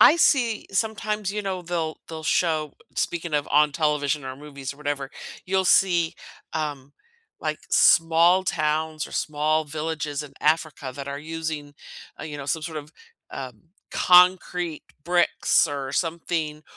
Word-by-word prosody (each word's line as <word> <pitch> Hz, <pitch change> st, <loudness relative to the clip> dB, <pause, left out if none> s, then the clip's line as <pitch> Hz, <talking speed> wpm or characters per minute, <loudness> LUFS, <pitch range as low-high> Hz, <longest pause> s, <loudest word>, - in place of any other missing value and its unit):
I 315 Hz, -, +8 dB
see 245 Hz, -9 st, +3 dB
sometimes, 210 Hz, -1 st, -1 dB
you 210 Hz, -, -2 dB
know, 190 Hz, -2 st, -3 dB
they'll 165 Hz, -2 st, -2 dB
they'll 160 Hz, -1 st, -7 dB
show 155 Hz, -2 st, +1 dB, 0.2 s
speaking 170 Hz, -1 st, -2 dB
of 145 Hz, -1 st, 0 dB
on 150 Hz, 0 st, +4 dB
television 150 Hz, -1 st, 0 dB
or 130 Hz, 0 st, -6 dB
movies 140 Hz, -2 st, -7 dB
or -, -, -18 dB
whatever, 145 Hz, -2 st, -3 dB, 0.4 s
you'll 190 Hz, 0 st, +1 dB
see, 175 Hz, -3 st, +4 dB, 0.4 s
um, 145 Hz, -3 st, -4 dB, 0.5 s
like, -, -, -2 dB
small 170 Hz, +3 st, +5 dB
towns 155 Hz, -2 st, -1 dB
or -, -, -14 dB
small 155 Hz, +1 st, 0 dB
villages 155 Hz, -1 st, -3 dB
in 145 Hz, -2 st, -11 dB
Africa 155 Hz, -4 st, 0 dB
that 140 Hz, 0 st, -6 dB
are 140 Hz, 0 st, -4 dB
using, 155 Hz, -2 st, -5 dB, 0.5 s
uh, -, -, -6 dB
you 150 Hz, -2 st, -6 dB
know, 140 Hz, -, -7 dB
some 160 Hz, +2 st, -1 dB
sort 160 Hz, -1 st, -4 dB
of, 150 Hz, +1 st, -11 dB, 0.4 s
um, 125 Hz, -5 st, -7 dB, 0.3 s
concrete 180 Hz, -2 st, +4 dB, 0.2 s
bricks 175 Hz, -1 st, +3 dB
or 140 Hz, -2 st, -4 dB
something, 160 Hz, -2 st, -2 dB
155 Hz, 145 wpm, -25 LUFS, 145-175 Hz, 0.5 s, I